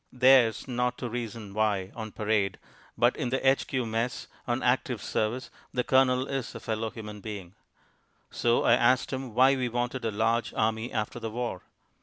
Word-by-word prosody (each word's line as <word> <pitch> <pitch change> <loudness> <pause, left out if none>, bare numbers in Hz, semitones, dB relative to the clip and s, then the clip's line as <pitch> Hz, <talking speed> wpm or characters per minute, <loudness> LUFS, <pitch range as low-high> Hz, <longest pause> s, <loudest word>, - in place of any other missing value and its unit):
"Theirs 125 -2 +4
not 125 -1 -1
to 125 - -4
reason 115 -4 -5
why" 100 -3 0
on 110 -2 -6
parade, 105 -3 0 0.4
but 120 +2 +3
in 130 -6 -2
the 135 +1 0
H.Q. 135 -1 +2
Mess 115 +2 -2 0.2
on 120 +1 -1
active 125 -1 +1
service 115 +4 -2 0.2
the 125 - +1
Colonel 130 0 +3
is 135 -3 -4
a - - -5
fellow 110 0 -2
human 105 -2 -8
being. 100 -5 -7 0.8
So 120 0 +2
I - - +5
asked 125 +3 +3
him 130 -4 -5
why 130 +2 +6
we 125 -2 -1
wanted 120 +2 -2
a 115 - 0
large 115 +2 0
army 110 +2 0
after 110 +2 -3
the 115 -1 -4
war. 115 -4 -3
120 Hz, 175 wpm, -28 LUFS, 110-125 Hz, 0.8 s, why